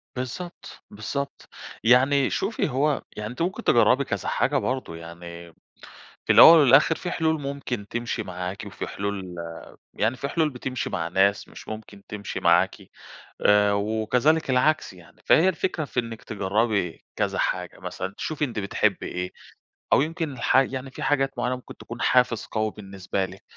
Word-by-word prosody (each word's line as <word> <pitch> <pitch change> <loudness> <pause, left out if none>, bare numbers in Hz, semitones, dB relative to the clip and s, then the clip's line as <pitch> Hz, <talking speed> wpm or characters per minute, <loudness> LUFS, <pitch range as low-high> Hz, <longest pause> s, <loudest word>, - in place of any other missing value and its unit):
بالضبط، 130 +8 -7
بالضبط. 140 +7 -5 0.4
يعني 130 +4 +4
شوفي 200 -4 -1
هو 140 +2 +1 0.2
يعني 105 0 -4
أنتِ 125 - -7
ممكن 190 +7 -2
تجرّبي 125 +3 +4
كذا - - -4
حاجة 145 +1 +1
برضو، 130 -8 -2
يعني 85 0 -10 0.7
في - - +4
الأوّل 165 0 +10
والآخر 145 +3 +6
في 180 - -5
حلول 160 -2 0
ممكن 135 -7 -4
تمشي 120 0 -3
معاكِ 90 0 -5
وفي - - -6
حلول 100 -3 -4
آآ، 85 -1 -7 0.4
يعني 110 +4 0
في 140 - -4
حلول 155 0 +1
بتمشي 130 -1 -4
مع 85 -1 -2
ناس 95 +3 +2
مش - - -13
ممكن 110 -2 -8
تمشي 105 -1 -5
معاكِ 85 +2 +3 0.7
آآ، 105 0 +5
وكذلك 110 +9 +1
العكس 130 -1 +2
يعني. 90 -2 -18
فهي 180 +4 +5
الفكرة 170 -2 -2
في 125 - -2
إنِك 115 -2 -6
تجرّبي 100 -2 -1
كذا - - -1
حاجة، - - -2
مثلًا 95 +1 -5
تشوفي 155 -1 -2
أنت 120 -5 -5
بتحبي 100 -1 0
إيه 90 0 -4 0.6
أو - - +5
يمكن 160 +1 -2
الحا 130 +1 +3
يعني 130 0 -6
في - - -7
حاجات 135 -1 +2
معيّنة 125 +1 0
ممكن 125 - -12
تكون - - -9
حافز 125 -3 +2
قوي 110 0 -2
بالنسبة 95 -2 -4
لِك، 95 +1 -12
120 Hz, 160 wpm, -25 LUFS, 100-140 Hz, 0.7 s, الأوّل